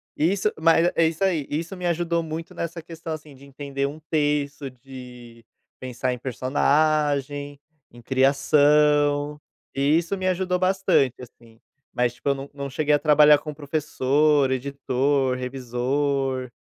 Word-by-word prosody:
Isso 190 +7 +1
mas 165 +1 +4
eh, - - -1
é 165 - +3
isso 165 +3 -5
aí. 165 -7 +1
Isso 165 +6 -4
me 180 -1 -6
ajudou 170 0 0
muito 160 +1 -6
nessa 170 0 -5
questão, 165 0 -9
assim, 150 -2 -10
de 135 - -17
entender 140 0 -4
um 150 +3 -8
texto, 145 -2 -1
de 125 -2 -13 0.4
pensar 125 0 -3
em - - -6
personagem, 145 +2 0 0.3
em 120 0 -15
criação, 145 +2 +2 0.3
e 140 +3 +3
isso 170 +3 -1
me 185 -1 -3
ajudou 180 0 0
bastante 185 -8 +2
assim. 115 -2 -16 0.3
Mas, 125 -1 0
tipo, 125 +3 -4
eu 140 - +2
não 135 +1 -8
não 140 -1 -6
cheguei 150 +2 0
a 145 - +4
trabalhar 150 0 +6
com 150 0 -7
professor, 145 -1 +1
editor, 135 0 0
revisor, 130 +1 -2
145 Hz, 150 wpm, -23 LUFS, 130-155 Hz, 0.4 s, trabalhar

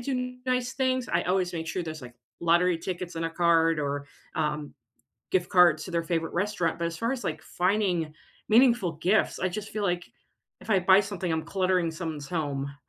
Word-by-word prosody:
do 250 0 -3
nice 250 -1 0
things. 260 -2 0
I 170 +1 +2
always 180 0 0
make 165 -2 -4
sure 180 - -2
there's 155 -3 -6
like 120 -1 -10 0.3
lottery 170 +1 +3
tickets 180 0 -5
in 165 - -2
a 165 - -1
card 165 -1 +3
or, 145 -1 -2 0.3
um, 150 -1 -2 0.6
gift 180 -2 +1
cards 170 -4 +5
to 185 - -8
their 170 -1 0
favorite 165 -1 -2
restaurant. 180 -3 -1
But 170 - -1
as 165 0 -6
far 230 +1 -1
as, 265 -4 -3
like, 155 -2 -3
finding 180 -4 0 0.4
meaningful 230 -6 +4
gifts, 180 +8 +1
I 185 - 0
just 210 +3 -5
feel 215 - -3
like 175 -2 0 0.6
if - - -13
I 195 -3 +4
buy 190 +2 +6
something, 195 -3 -4
I'm 160 0 -1
cluttering 185 -3 +1
someone's 160 -4 -5
home. 140 -4 -3
175 Hz, 195 wpm, -27 LUFS, 160-195 Hz, 0.6 s, buy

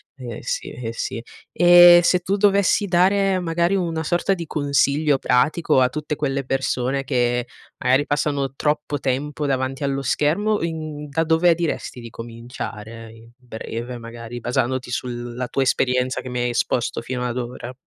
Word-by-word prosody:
Eh, 120 -5 -7
sì, - - -3
eh, 115 -2 -6
sì. 115 +1 -4 0.3
E 175 0 +8
se 180 +1 +3
tu 190 +3 -1
dovessi 200 0 +3
dare, 190 +2 +3
magari 170 +2 0
una 165 -4 -1
sorta 175 +4 +1
di 170 - -6
consiglio 145 0 +1
pratico 130 +3 +2
a 125 - +4
tutte 150 +2 -4
quelle 140 -2 -2
persone 135 0 -1
che, 120 -2 0 0.3
magari, 130 +3 +2
passano 145 -2 -1
troppo 150 0 -1
tempo 145 +3 -2
davanti 135 +1 -2
allo 135 0 -1
schermo, 205 +11 +1
in 155 -3 -5
da 160 +3 0
dove 165 +2 +4
diresti 160 -6 -3
di 115 -1 -9
cominciare 115 -1 -8
in 115 +1 -16
breve, 120 0 -7
magari 115 +1 -8
basandoti 125 +1 -1
sulla 120 0 -4
tua 135 - 0
esperienza 125 0 +1
che 130 - -8
mi 125 0 -3
hai 120 - 0
esposto 120 0 -1
fino 125 +1 -4
ad 120 - -4
ora? 125 0 -6
135 Hz, 160 wpm, -22 LUFS, 125-160 Hz, 0.3 s, E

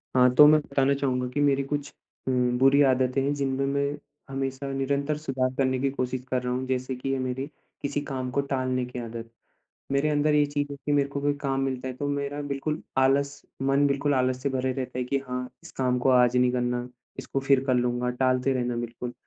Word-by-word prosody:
हाँ, 125 0 +5
तो 150 - +10
मैं 155 +1 +6
बताना 140 -1 +1
चाहूँगा 130 -2 -1
की 145 - -1
मेरी 140 -1 +3
कुछ 145 +1 -3 0.4
उम, 125 -1 +1
बुरी 135 +2 +5
आदतें 130 0 +2
हैं 140 - +1
जिनमे 135 -1 -1
मैं 140 +1 -1 0.3
हमेशा 135 0 -3
निरंतर 140 +2 -1
सुधार 130 -4 -1
करने 130 -1 +2
की 135 +1 +1
कोशिश 130 -1 -2
कर 130 -1 +1
रहा 125 0 -1
हूँ, 130 +1 -2
जैसे 130 0 -2
की 130 +2 -3
ये 135 - 0
मेरी 130 +1 -2 0.4
किसी 145 0 -2
काम 130 -1 -3
को 140 - +1
टालने 130 -1 0
की 125 0 -7
आदत। 115 -1 -7 0.6
मेरे 140 +2 +2
अंदर 150 0 +2
ये 150 0 +5
चीज़ 145 0 -2
है 140 - -5
की 145 - +1
मेरे 140 -1 +2
को 140 0 -4
कोई 145 +1 +2
काम 135 -1 -1
मिलता 130 -1 -2
है 130 - -5
तो 145 - -4
मेरा 140 0 -2
बिल्कुल 145 +2 -3 0.2
आलस 140 +2 +2 0.2
मन 135 +1 +3
बिल्कुल 140 +1 +1
आलस 130 0 0
से 140 - +1
भरे 130 -1 -1
रहता 130 -1 -4
है 125 - 0
की 135 +2 0
हाँ, 125 0 -3
इस - - -12
काम 125 -1 +1
को 130 +2 +2
आज 125 -1 +4
नहीं 125 0 +3
करना, 125 0 -1 0.3
इसको 135 - -3
फिर 135 0 +3
कर 130 - +3
लूँगा 125 0 0
टालते 130 +1 +2
रहना 125 -2 -1
बिल्कुल। 120 +1 -5
135 Hz, 220 wpm, -26 LUFS, 125-140 Hz, 0.6 s, तो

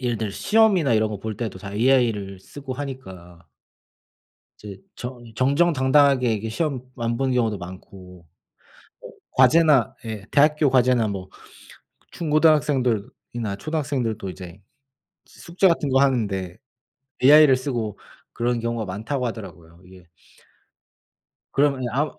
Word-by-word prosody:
예를 120 -3 -1
들어 110 -3 -3
시험이나 195 - +2
이런 110 0 +1
거 105 - -6
볼 110 -1 -5
때도 105 -6 -5
다 100 -1 -8
AI를 110 -5 +1
쓰고 135 +4 -9
하니까 95 - -9 1.1
이제 100 -2 -10 0.2
정 125 0 -8
정정당당하게 135 -2 +3
이게 110 +2 -4
시험 135 +1 -2
안 115 -1 -2
보는 135 0 -1
경우도 115 -4 0
많고 90 -1 -12 0.7
뭐 - - -11 0.2
과제나 135 0 +4
예 110 -3 -6
대학교 150 0 +3
과제나 125 -3 +3
뭐 95 -2 -6 0.8
중고등학생들이나 135 - 0
초등학생들도 135 - -3
이제 90 +1 -11 0.7
숙제 180 +3 -1
같은 165 -4 0
거 135 +1 +3
하는데 100 -9 -1 0.7
AI를 145 -1 +7
쓰고 120 -6 -4 0.4
그런 120 0 -1
경우가 115 -1 -3
많다고 110 +8 -4
하더라고요 90 -7 -10
이게 90 -1 -16 1.5
그러면은 135 -3 +1
아무 150 +4 0
120 Hz, 285 characters per minute, -23 LUFS, 100-140 Hz, 1.5 s, AI를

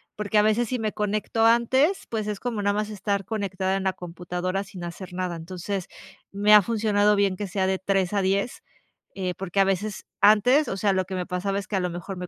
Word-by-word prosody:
porque 210 0 -1
a - - +6
veces 215 +2 +2
si 255 - -2
me 215 -1 -1
conecto 215 +2 0
antes, 260 +10 +3
pues 215 -2 -3
es 210 -2 -3
como 235 -4 -3
nada 205 0 +1
más 210 +1 -2
estar 200 -1 -2
conectada 195 -2 -2
en 195 - -3
la 190 -1 +1
computadora 180 +2 -4
sin 190 -3 -10
hacer 180 +2 -8
nada. 180 -1 -3
Entonces, 185 +3 -5 0.4
me 205 +2 +3
ha 210 - +10
funcionado 210 -1 +2
bien 200 -2 +2
que 205 +2 -4
sea 190 +1 -1
de 190 0 0
3:00-10:00, 195 +3 0 0.5
eh, 185 -2 -2
porque 195 +1 -3
a - - +7
veces 195 +2 -2 0.2
antes, 230 +8 +5
o 195 - -3
sea, 200 0 +2
lo 185 0 0
que 190 +1 -6
me 180 - -2
pasaba 195 +2 -2
es 195 - -8
que 210 - -3
a - - +2
lo 180 -1 -1
mejor 175 +2 -6
me 180 0 -6
200 Hz, 225 wpm, -25 LUFS, 185-210 Hz, 0.5 s, ha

